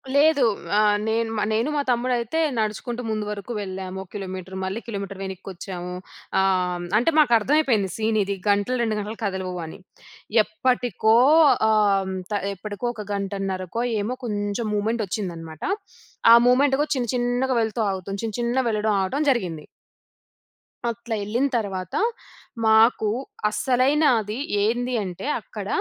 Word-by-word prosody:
లేదు. 290 -1 +5 0.3
ఆహ్, 210 -1 +4
నేను 225 +1 0
మ - - 0
నేను, 225 +6 +1
మా 290 - +2
తమ్ముడయితే 245 +3 0 0.2
నడుచుకుంటూ 220 +3 -2
ముందు 215 -1 -2
వరుకు 205 +2 -6
వెళ్ళాము. 190 -1 -5
ఒక 185 - -21
కిలోమీటర్. 190 -1 -6
మళ్ళీ 190 +4 -2
కిలోమీటర్. 200 -3 -5
వెనిక్కొచ్చాము. 185 -1 -6 0.5
ఆహ్, 190 - +4 0.3
హ్మ్, 175 0 -5
అంటే, 245 +9 +3
మాకర్థమైపోయింది 240 -5 +3
సీనిది, 215 -3 0
గంటలు, 205 +5 +2
2 220 -2 0
గంటలు 210 +2 -5
కదలవు 190 -3 -3
అని. 160 - -10 0.6
ఎప్పటికో 245 - +1 0.5
ఆహ్, 200 -3 +2 0.2
త - - -1 0.2
ఎప్పడకో 205 +3 -5
ఒక 210 - -6
గంటన్నరకో 195 +1 -3 0.2
ఏమో 220 +5 -2
కొంచం 205 +1 -2
మూమెంటొచ్చిందనమాట. 195 -7 -3 0.7
ఆ - - +11
మూమెంట్ 270 +2 +4
గో - - +2
చిన్న 250 -2 -1
చిన్నగా 245 +2 0
వెళ్తూ 220 0 -2
ఆగుతుం, 195 +1 -4
చిన్న 220 -2 -3
చిన్నగా 240 +2 0
వెళ్ళడం, 215 0 0
ఆగటం 270 +11 -1
జరిగింది. 180 - -1 1.3
అట్లా 235 0 -4
యెళ్ళిన 230 +7 0
తర్వాత, 190 -5 -4 0.7
మాకు 220 0 +5 0.4
అసలైన 255 +7 +2 0.2
అది 210 +2 -5 0.3
ఏంది 245 +3 0
అంటే, 180 +2 -6 0.2
అక్కడ 205 -1 -8
215 Hz, 130 wpm, -24 LUFS, 195-240 Hz, 1.3 s, ఆ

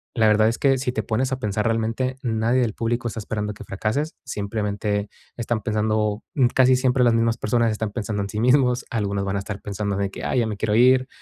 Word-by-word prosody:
la 110 -2 +4
verdad 110 0 +4
es 115 - -2
que 135 -1 +3
si 125 -1 -1
te 110 - -2
pones 125 +6 -1
a 130 - -3
pensar 105 -2 -1
realmente, 115 +3 -1
nadie 115 +1 +1
del 115 -4 0
público 115 +2 -1
está 115 - -6
esperando 105 0 -3
que - - -11
fracases, 110 +11 -2
simplemente 105 -2 -2 0.3
están 120 -1 -2
pensando, 105 0 0
mm, 130 -4 +4
casi 130 0 +5
siempre 130 0 +2
las 120 - +4
mismas 115 0 +1
personas 115 +1 +1
están 110 0 -3
pensando 105 -3 -3
en - - -4
sí 105 - -4
mismos, 125 0 +3
algunos 100 -3 -1
van 100 0 -1
a - - -1
estar 100 0 -6
pensando 100 0 -3
de 100 -1 -1
que: - - -7
"Ay, 130 - +1
ya 115 - 0
me 105 -2 -4
quiero 105 +1 0
ir", 130 +2 +5
110 Hz, 230 wpm, -23 LUFS, 105-125 Hz, 0.3 s, casi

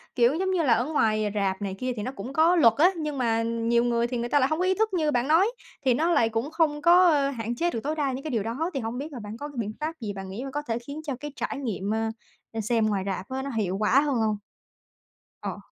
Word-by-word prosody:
kiểu, 240 +1 +4
giống 375 +3 0
như 360 -3 +1
là, 255 -6 +4
ở 235 +2 +1
ngoài 215 -8 +1
rạp 195 -1 0
này 195 -2 -3
kia 255 0 -1
thì 210 - -4
nó 255 - -3
cũng 260 +1 -7
có 325 +4 +4
luật 295 -10 +6
á, 345 +6 +6
nhưng 300 -3 -3
mà 230 -3 +1
nhiều 230 +1 +1
người 235 -1 +1
thì 245 0 -3
người 235 +1 -3
ta 290 - +4
lại 260 - +3
hông 315 - -1
có 365 - +2
ý 375 - +3
thức 440 +1 0
như 310 -4 +1
bạn 245 -1 +1
nói 330 +6 +5 0.4
thì 255 - +5
nó 320 +8 +1
lại 230 -9 +3
cũng 230 +6 -2
không 315 -3 +1
có 350 +3 +6 0.2
hạn 235 -2 -4
chế 345 +8 +1
được 230 - -3
tối 300 +3 -1
đa 290 -3 0
những 260 +1 -5
cái 310 - -4
điều 225 -5 0
đó. 255 - -2
Thì 275 - -1
hông 230 0 -4
biết 290 +4 -5
là 255 - -6
bạn 210 0 -7
có 290 - -5
cái 290 - -12
biện 215 -1 -3
pháp 310 +2 -2
gì 215 -4 -4
bạn 195 -1 -7
nghĩ 205 +7 -5
bạn 270 - -6
có 295 +2 -2
thể 235 -5 -3
khiến 280 +6 -8
cho 285 -4 -3
cái 295 +1 -6
trải 285 - -3
nghiệm, 215 -7 -3 0.6
ơ, 225 - -3
xem 225 +1 +1
ngoài 200 -3 0
rạp 190 -1 -4
á 260 0 -3
nó 275 - -4
hiệu 190 -3 0
quả 215 +6 +4
hơn 290 -2 0
hông? 220 -2 +1 1.0
Ờ. - - -4
255 Hz, 290 wpm, -26 LUFS, 225-300 Hz, 1.0 s, luật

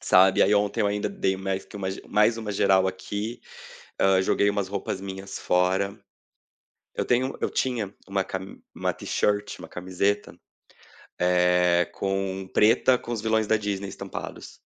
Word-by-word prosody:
Sabe, 95 +1 +5
aí 105 +2 +4
ontem 105 +2 +1
eu 105 - +3
ainda 105 0 -1
dei 145 - -1
mais 95 0 -3
que - - -11
uma 95 -2 -3 0.2
mais 105 +2 +3
uma 110 -2 -4
geral 95 -1 +3
aqui, 105 +5 -4 0.6
ah, 95 -1 +4
joguei 100 +2 +2
umas 100 -2 -1
roupas 100 -1 -3
minhas 95 0 -7
fora. 95 +2 +1 1.0
Eu - - -2
tenho 130 +2 +1
eu - - 0
tinha 115 -6 -1
uma 95 -1 0
cami 95 0 -7
uma - - -1
t-shirt, 105 0 -1
uma - - -9
camiseta. 95 +3 -2 0.8
É 90 -1 +4
com 95 -1 -2
preta 120 +4 +5
com 120 - -7
os 110 - -2
vilões 110 -1 +1
da 110 - +3
Disney 100 -2 -3
estampados. - - -8
100 Hz, 155 wpm, -26 LUFS, 95-105 Hz, 1.0 s, Sabe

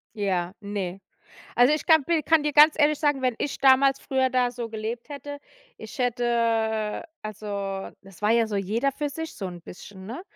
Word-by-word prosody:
Ja, 185 -4 -1
ne. 200 -3 -5 0.6
Also, 245 +4 +5
ich 305 - -2
kann 315 -3 +5
bi 335 0 +1
kann 320 +1 +3
dir 300 0 -1
ganz 300 +2 +7
ehrlich 300 -1 +3
sagen, 290 -3 +1
wenn 255 -2 +1
ich 285 - -3
damals 270 0 +5
früher 265 -2 0
da 250 -1 +2
so 240 -1 -6
gelebt 225 +3 -5
hätte, 285 0 -7 0.4
ich - - -10
hätte 230 -3 0 0.2
also, 200 -2 -5
das 195 -2 -16
war 210 - +2
ja 230 0 +3
so 210 -2 -3
jeder 220 +8 0
für 295 +2 -3
sich 320 +3 -6
so 195 - -5
'n 175 -1 -8
bisschen, 190 +2 -11
ne? 245 - -7
240 Hz, 190 wpm, -25 LUFS, 205-280 Hz, 0.6 s, ganz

